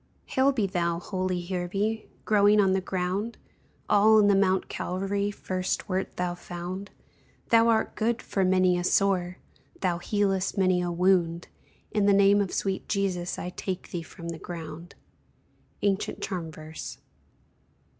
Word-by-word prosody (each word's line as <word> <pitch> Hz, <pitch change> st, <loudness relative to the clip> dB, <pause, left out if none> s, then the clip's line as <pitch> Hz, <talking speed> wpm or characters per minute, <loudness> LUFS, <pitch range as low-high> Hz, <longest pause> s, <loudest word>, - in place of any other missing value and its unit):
"Hail 265 Hz, +1 st, +3 dB
be 230 Hz, -7 st, 0 dB
thou, 170 Hz, -3 st, 0 dB
holie 185 Hz, 0 st, -2 dB
hearbe, 195 Hz, +5 st, -2 dB, 0.2 s
Growing 210 Hz, 0 st, +5 dB
on 195 Hz, -2 st, +4 dB
the 190 Hz, -, +1 dB
ground, 190 Hz, +5 st, -2 dB, 0.5 s
All 215 Hz, +2 st, +6 dB
in 210 Hz, -, +6 dB
the 200 Hz, -1 st, +5 dB
mount 190 Hz, -1 st, +2 dB
Calvary 195 Hz, +2 st, -2 dB
First 185 Hz, -2 st, -3 dB
wert 190 Hz, -1 st, -2 dB
thou 180 Hz, -1 st, -1 dB
found; 180 Hz, +2 st, -6 dB, 0.6 s
Thou 230 Hz, 0 st, +5 dB
art 225 Hz, -1 st, +2 dB
good 235 Hz, +2 st, 0 dB
for 195 Hz, -, -1 dB
manie 185 Hz, -1 st, +3 dB
a -, -, -2 dB
sore, 185 Hz, -1 st, +1 dB, 0.4 s
Thou 175 Hz, -2 st, 0 dB
healest 195 Hz, 0 st, 0 dB
manie 185 Hz, -2 st, +3 dB
a 175 Hz, 0 st, -1 dB
wound, 175 Hz, -1 st, +2 dB, 0.4 s
In 210 Hz, -2 st, +2 dB
the 200 Hz, -, +6 dB
name 200 Hz, +1 st, +5 dB
of 195 Hz, -, -1 dB
sweete 195 Hz, -1 st, -2 dB
Jesus 185 Hz, -3 st, -1 dB
I 180 Hz, -, -5 dB
take 185 Hz, 0 st, -5 dB
thee 175 Hz, -, -3 dB
from 170 Hz, +1 st, -9 dB
the 165 Hz, -1 st, -6 dB
ground." 165 Hz, 0 st, -8 dB, 0.9 s
_Ancient 200 Hz, -1 st, 0 dB
Charm 175 Hz, -4 st, -4 dB
verse. 155 Hz, +1 st, -8 dB
190 Hz, 150 wpm, -27 LUFS, 175-200 Hz, 0.9 s, All